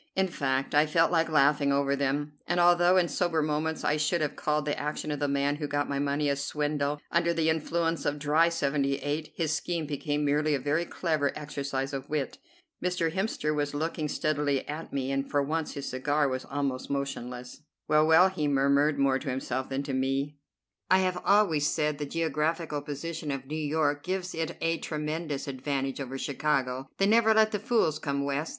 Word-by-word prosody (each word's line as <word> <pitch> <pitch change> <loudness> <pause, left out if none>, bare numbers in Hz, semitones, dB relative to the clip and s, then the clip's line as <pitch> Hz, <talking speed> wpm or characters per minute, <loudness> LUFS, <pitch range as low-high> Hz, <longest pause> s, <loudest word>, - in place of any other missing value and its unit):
In 190 -1 +2
fact 135 -4 -1
I 150 +1 +5
felt 165 +2 +3
like 165 -1 +2
laughing 145 -1 +3
over 140 0 +2
them, 140 +2 -1
and 175 +1 +1
although 175 +1 +5
in 180 -2 +4
sober 165 -3 0
moments 155 +1 -1
I 150 - +2
should 155 +3 +1
have 150 - -1
called 150 0 0
the 145 - -1
action 150 +1 -3
of 145 - -3
the 145 - 0
man 140 +1 +1
who 150 -1 -3
got 145 0 -1
my 140 -1 -2
money 145 +1 0
a 140 - +2
swindle, 145 +1 -1
under 170 0 +2
the 160 -1 +2
influence 165 +1 -1
of 145 0 -1
dry 155 +3 +3
'78 145 0 -1
his 160 -2 0
scheme 165 +1 -2
became 145 0 -2
merely 150 +1 +2
a - - -1
very 145 +6 0
clever 155 -5 0
exercise 140 -2 -3
of 135 -1 -5
wit. 150 -3 -2 0.4
Mr. 180 -2 0
Hemster 190 -5 -1
was 145 -1 -1
looking 155 0 -2
steadily 145 -2 0
at 150 +3 -6
me, 135 -1 -2
and 135 0 -1
for 145 -1 +2
once 160 +2 -2
his 140 -1 -5
cigar 145 +3 +1
was 130 -1 -3
almost 135 -2 -3
motionless. 125 -2 -4 0.3
"Well, 155 0 +4
well," 165 +4 +7
he 155 -6 -2
murmured, 140 +1 +3
more 135 -1 +2
to 140 - -5
himself 130 0 -3
than 135 +1 -2
to 140 -1 -4
me, 135 +2 -1 0.5
"I 185 - +6
have 185 -1 0
always 180 -8 +3
said 150 -2 0
the 145 - -3
geographical 160 0 -1
position 150 +2 -5
of 135 -2 -3
New 150 +3 -5
York 150 -1 0
gives 185 +1 -3
it 165 +1 -3
a 165 0 0
tremendous 150 -1 -3
advantage 135 0 -2
over 135 0 -5
Chicago. 135 -2 -1
They 195 - +3
never 220 +1 +5
let 220 0 +5
the 210 - -1
fools 205 - +1
come 140 -2 -2
West. 140 +2 -1
150 Hz, 195 wpm, -28 LUFS, 140-160 Hz, 0.5 s, well